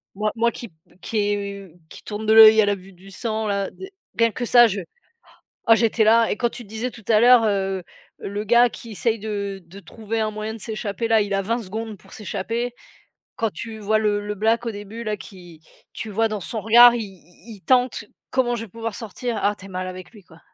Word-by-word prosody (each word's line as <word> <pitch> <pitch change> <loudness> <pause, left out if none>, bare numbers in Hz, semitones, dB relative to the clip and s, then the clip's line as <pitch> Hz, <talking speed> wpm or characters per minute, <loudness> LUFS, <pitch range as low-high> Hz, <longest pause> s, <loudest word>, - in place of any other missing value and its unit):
Moi 210 +1 -1
moi, 235 +1 +2
qui 235 - -9
p 160 - -34 0.3
qui 220 - -4
est, 205 -1 -1
heu, 160 - -22 0.2
qui - - -13
tourne 210 +1 -6
de 220 - +4
l'œil 220 0 +9
à 205 - +3
la 205 - +2
vue 190 0 -15
du 190 +2 -16
sang 220 +2 -3
là, 200 -1 -1
d 380 +1 -11 0.3
rien 230 -1 +4
que 240 - -4
ça 240 0 +7
je 200 -1 -3 0.9
ah - - +10
j'étais 225 0 +2
là 225 +1 +5
et - - -1
quand 240 +1 +1
tu 240 - -10
disais 220 +4 -4
tout 225 - -14
à 220 -2 +5
l'heure, 245 -1 +6
heu, 195 -3 -1 0.4
le 205 +1 -5
gars 240 +3 +5
qui 230 -2 -10
essaie 225 +2 -1
de 200 -2 -5
de 190 +4 -12
trouver 225 +2 -6
un 215 - 0
moyen 215 +1 -5
de - - -9
s'échapper 220 +1 -4
là, 225 -1 +4
il 200 -1 -3
a 195 - +1
20 230 +4 -1
secondes 220 +2 -6
pour - - -20
s'échapper. 230 +4 -4 0.6
Quand 225 -1 -1
tu 225 -1 -7
vois 215 +1 +1
le 210 -1 +1
le 210 - -3
black 225 +3 +1
au - - 0
début 205 +3 -8
là, 215 -1 -2
qui 175 -5 -13 0.3
tu 220 - -6
vois 225 +2 +1
dans 215 -2 -4
son 220 +5 -5
regard 240 +2 +8
i 235 - -2
i 190 +3 -14
il - - -19
tente: 250 -3 +2 0.3
«Comment 250 -2 +1
je 225 - -5
vais 230 - -13
pouvoir 230 +1 -5
sortir?» 230 +2 -5
Ah, 205 +1 +2
tu - - -13
es - - -11
mal 185 0 -4
avec 185 0 -9
lui, 210 - -15
quoi. 165 -1 -19
215 Hz, 240 wpm, -22 LUFS, 200-230 Hz, 0.9 s, ah